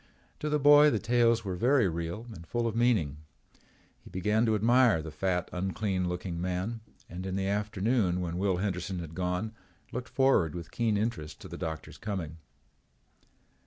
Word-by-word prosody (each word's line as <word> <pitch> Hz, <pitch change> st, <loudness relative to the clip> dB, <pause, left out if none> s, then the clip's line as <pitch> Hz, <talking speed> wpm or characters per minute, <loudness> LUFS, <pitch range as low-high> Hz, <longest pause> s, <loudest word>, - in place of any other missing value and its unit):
To 150 Hz, -, -2 dB
the 150 Hz, -, +2 dB
boy 145 Hz, +1 st, +7 dB
the 115 Hz, -, +1 dB
tales 115 Hz, 0 st, +2 dB
were 95 Hz, -2 st, -2 dB
very 125 Hz, +2 st, +3 dB
real 85 Hz, +6 st, -4 dB
and 85 Hz, -4 st, -11 dB
full 120 Hz, -1 st, -1 dB
of 115 Hz, -1 st, -1 dB
meaning. 110 Hz, -, +2 dB, 0.9 s
He -, -, -13 dB
began 105 Hz, +5 st, +1 dB
to 110 Hz, -, +3 dB
admire 115 Hz, -2 st, +4 dB
the 80 Hz, -, -7 dB
fat 90 Hz, +2 st, -1 dB
unclean 95 Hz, 0 st, -1 dB
looking 90 Hz, -1 st, -4 dB
man 95 Hz, +5 st, -2 dB, 0.3 s
and, 90 Hz, +1 st, -7 dB
in 95 Hz, 0 st, -3 dB
the 95 Hz, 0 st, -1 dB
afternoon 105 Hz, -1 st, 0 dB
when 90 Hz, -1 st, -3 dB
Will 95 Hz, -2 st, +1 dB
Henderson 95 Hz, -1 st, -2 dB
had 85 Hz, -2 st, -6 dB
gone, 90 Hz, +5 st, -2 dB, 0.4 s
looked 125 Hz, 0 st, -5 dB
forward 130 Hz, -, +3 dB
with 85 Hz, -1 st, -7 dB
keen 115 Hz, -3 st, +1 dB
interest 105 Hz, -8 st, -3 dB
to -, -, -8 dB
the -, -, -8 dB
doctor's 80 Hz, -2 st, -6 dB
coming. 95 Hz, -6 st, -4 dB
95 Hz, 170 wpm, -29 LUFS, 90-115 Hz, 0.9 s, boy